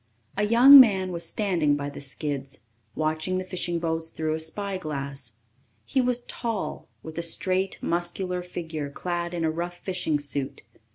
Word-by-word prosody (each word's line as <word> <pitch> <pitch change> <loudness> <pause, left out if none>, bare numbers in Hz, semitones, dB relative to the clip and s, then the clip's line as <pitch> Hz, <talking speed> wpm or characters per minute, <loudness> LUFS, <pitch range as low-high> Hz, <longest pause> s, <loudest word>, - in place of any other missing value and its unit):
A 210 +1 +1
young 255 +5 +10
man 190 -7 +5
was 170 -1 -3
standing 175 -9 +1
by 140 0 -3
the 145 - -8
skids, 140 -1 -3 0.3
watching 155 +4 -1
the 185 - -2
fishing 175 -2 -2
boats 165 -1 -2
through 155 -1 -2
a 160 - -2
spyglass. 155 - -5 0.5
He 265 - +1
was 250 -1 0
tall, 230 -5 -4 0.2
with 160 +1 -6
a - - 0
straight, 185 +3 0
muscular 180 +1 -1
figure 160 -4 -5
clad 175 +3 -3
in 170 -2 -2
a 160 - +1
rough 175 +2 -4
fishing 180 -5 -1
suit. 140 -1 -4
170 Hz, 160 wpm, -26 LUFS, 155-185 Hz, 0.5 s, young